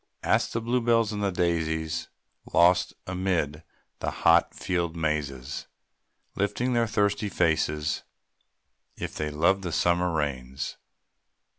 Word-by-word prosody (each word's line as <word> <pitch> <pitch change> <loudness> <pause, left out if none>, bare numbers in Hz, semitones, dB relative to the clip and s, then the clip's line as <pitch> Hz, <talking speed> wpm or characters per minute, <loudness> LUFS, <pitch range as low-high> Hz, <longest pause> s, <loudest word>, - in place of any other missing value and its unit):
Ask - - +2
the 115 - -1
blue 120 +2 +1
bells 115 -2 +3
and 105 -1 -3
the 100 - +2
daisies, 80 -2 -1 0.4
Lost 90 +1 +4
amid 90 -5 -1 0.4
the - - -1
hot 85 +1 +3
field 85 -2 -1
mazes, 75 -5 -2 0.7
Lifting 105 +5 0
up - - +1
their 115 -1 +2
thirsty 105 -1 +1
faces, 80 -4 +1 1.0
If - - -5
they 75 - -2
love 85 +6 +2
the 90 -3 -4
summer 90 +2 +2
rains. 65 -5 -3
85 Hz, 125 wpm, -27 LUFS, 75-100 Hz, 1.0 s, Lost